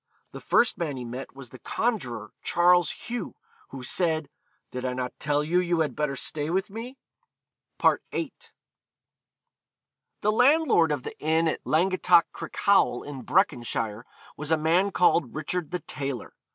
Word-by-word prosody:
The - - -9
first 240 - +2
man 150 -6 -2
he 125 - -6
met 125 +2 -7
was 135 -3 -10
the 130 - -12
conjuror 125 - -2
Charles 175 -1 +4
Hugh, 245 0 -5 0.3
who 130 - -8
said, 155 0 0 0.4
'Did 125 0 -5
I 130 -1 -1
not 125 0 -3
tell 145 0 +1
you 170 +4 +2
you 175 -2 +1
had 145 -6 -1
better 150 -2 -1
stay 150 +3 -4
with 190 +4 -1
me?' 235 +5 -7 0.8
VIII. - - +1 1.9
The 210 - +2
landlord 250 - +4
of 145 -4 -2
the - - -7
inn 160 +2 +2
at 160 - -1
Langattock 180 +1 +3
Crickhowel, 200 -11 +1
in 145 -3 -7
Breconshire, 120 - 0 0.3
was 150 0 -5
a 160 - +4
man 170 +6 +2
called 175 -8 +2
Richard 155 +2 -3
the 180 0 -3
Tailor. 140 -4 -5
160 Hz, 150 wpm, -26 LUFS, 135-180 Hz, 1.9 s, Charles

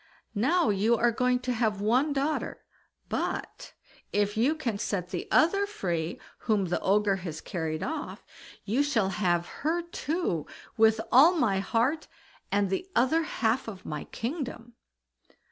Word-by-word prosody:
Now 250 - +2
you 210 +4 +3
are 240 +1 +3
going 250 +1 +1
to 250 0 -1
have 220 -3 0
one 250 +8 +2
daughter, 285 +2 -2 0.4
but - - -4 0.4
if 205 0 +1
you 255 +8 +2
can 235 -10 -3
set 185 -5 -2
the 180 - -4
other 395 +5 +3
free 170 - -3 0.3
whom 210 -3 +2
the 175 - 0
Ogre 200 0 +2
has 170 -4 -6
carried 160 -3 -3
off, 305 +1 -5 0.4
you 230 +7 +1
shall 265 -9 +1
have 175 -3 +1 0.2
her 330 +4 0
too 330 - -2 0.3
with 220 0 +4
all 305 +9 +7
my 215 - +2
heart, 235 - 0 0.4
and 200 -1 +1
the 365 - -2
other 260 +7 +3
half 245 -5 0
of 195 -4 -8
my 150 -1 -5
kingdom." 240 -2 -5
225 Hz, 145 wpm, -28 LUFS, 195-285 Hz, 0.4 s, all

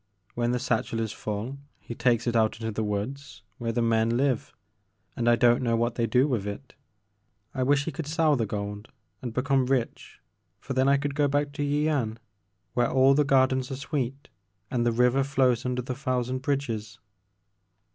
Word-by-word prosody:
When 120 0 0
the 125 - +1
satchel 115 -1 -1
is 110 -2 -2
full 110 +7 -5 0.2
he - - -8
takes 120 -1 +1
it 120 -1 0
out 110 -1 +3
into 110 -1 -3
the 110 +1 -2
woods 105 +3 -4 0.2
where 115 -1 -1
the 120 +1 0
men 115 0 +2
live 130 -3 0 0.6
and 120 0 +1
I 120 - +6
don't 120 0 +4
know 115 -2 +1
what 120 +1 0
they 115 -1 0
do 130 +4 +3
with 115 -8 -1
it. 125 +6 -7 0.8
I 130 - -3
wish 140 +2 +2
he 165 - -2
could 165 -3 -6
sell 155 -1 +2
the 115 -4 -1
gold 105 +1 -5 0.3
and 125 - -4
become 130 +1 +1
rich 130 -3 -2 0.4
for - - -5
then 130 +1 +3
I 140 - +5
could 140 0 -2
go 145 0 +2
back 145 +1 0
to 145 +1 -6
Yian 145 -6 0 0.6
where 120 -1 +2
all 135 +1 +5
the 150 +2 +3
gardens 130 -2 +2
are 135 - -3
sweet 140 0 -4 0.4
and 120 -2 +1
the - - +3
river 125 +3 +3
flows 130 -3 +1
under 125 0 -2
the 130 - -4
thousand 130 -1 -2
bridges." 130 -6 -3
125 Hz, 190 wpm, -27 LUFS, 115-140 Hz, 0.8 s, I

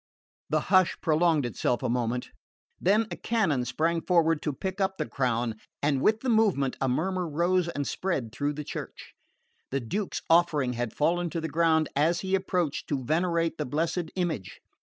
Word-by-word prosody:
The 155 +1 +2
hush 185 -2 +5
prolonged 160 -2 +2
itself 120 0 -1
a - - +1
moment; 120 0 -1 0.5
then 210 +5 +3
a - - -2
canon 190 - 0
sprang 165 +7 0
forward 165 -3 +2
to 150 - -1
pick 190 +7 -4
up 190 0 0
the 155 - -1
crown, 120 -5 -1 0.3
and 140 -2 +2
with 220 +6 +3
the 265 - -4
movement 205 - +2
a 135 - +2
murmur 180 +7 0
rose 175 +3 +1
and 145 -4 -3
spread 140 - -2
through 145 +5 -1
the 150 +1 -5
church. - - -8 0.6
The 135 - -1
Duke's 190 - -3
offering 155 -6 +3
had 120 -1 -3
fallen 170 +3 +1
to 165 - -3
the 160 - -3
ground 160 0 +3
as 165 +5 +2
he 190 0 -3
approached 180 -5 0
to 140 -3 -2
venerate 165 +2 0
the 150 - -1
blessed 160 +4 -1
image. 160 - -3
160 Hz, 175 wpm, -28 LUFS, 140-180 Hz, 0.6 s, hush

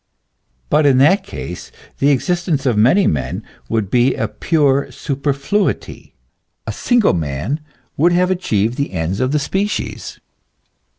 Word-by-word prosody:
But 150 -1 +4
in 135 -2 +4
that 180 +9 +4
case 90 - -8 0.3
the 140 - +3
existence 160 0 0
of 125 -4 +2
many 130 - +4
men 65 -4 -1 0.3
would 110 -4 -1
be 125 +1 +3
a 110 - -1
pure 140 +5 +1
superfluity; 140 +7 -2 0.5
a - - -3
single 240 -4 +2
man 80 - -2 0.4
would 170 +5 +4
have 180 +1 +2
achieved 115 - 0
the 140 -7 -2
ends 90 +2 -2
of 130 +1 0
the 150 - +2
species. 195 +8 -3
140 Hz, 135 wpm, -18 LUFS, 110-175 Hz, 0.5 s, But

